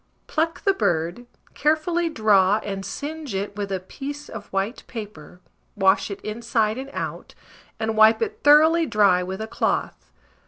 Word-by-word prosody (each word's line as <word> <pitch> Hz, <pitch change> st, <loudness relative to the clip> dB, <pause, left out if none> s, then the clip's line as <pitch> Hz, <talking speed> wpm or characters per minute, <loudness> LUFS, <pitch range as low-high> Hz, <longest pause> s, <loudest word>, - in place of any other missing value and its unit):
Pluck 325 Hz, +1 st, -2 dB
the 390 Hz, -, +3 dB
bird, 175 Hz, -, -1 dB, 0.3 s
carefully 320 Hz, +3 st, +1 dB
draw, 210 Hz, -6 st, +3 dB
and 195 Hz, -1 st, -4 dB
singe 290 Hz, -, -6 dB
it 200 Hz, +1 st, -3 dB
with 200 Hz, -1 st, -4 dB
a 190 Hz, -, -1 dB
piece 285 Hz, +10 st, -8 dB
of 215 Hz, -2 st, -8 dB
white 195 Hz, +5 st, -3 dB
paper, 205 Hz, -7 st, -9 dB, 0.3 s
wash 195 Hz, 0 st, +3 dB
it 200 Hz, -, -6 dB
inside 220 Hz, +1 st, -1 dB
and 270 Hz, +1 st, -7 dB
out, -, -, -6 dB, 0.4 s
and 220 Hz, 0 st, -1 dB
wipe 215 Hz, +1 st, +6 dB
it 435 Hz, -1 st, -3 dB
thoroughly 315 Hz, +3 st, +6 dB
dry 205 Hz, -6 st, +3 dB
with 190 Hz, +2 st, -5 dB
a 220 Hz, -, -4 dB
cloth. -, -, -2 dB
220 Hz, 155 wpm, -23 LUFS, 195-295 Hz, 0.4 s, wipe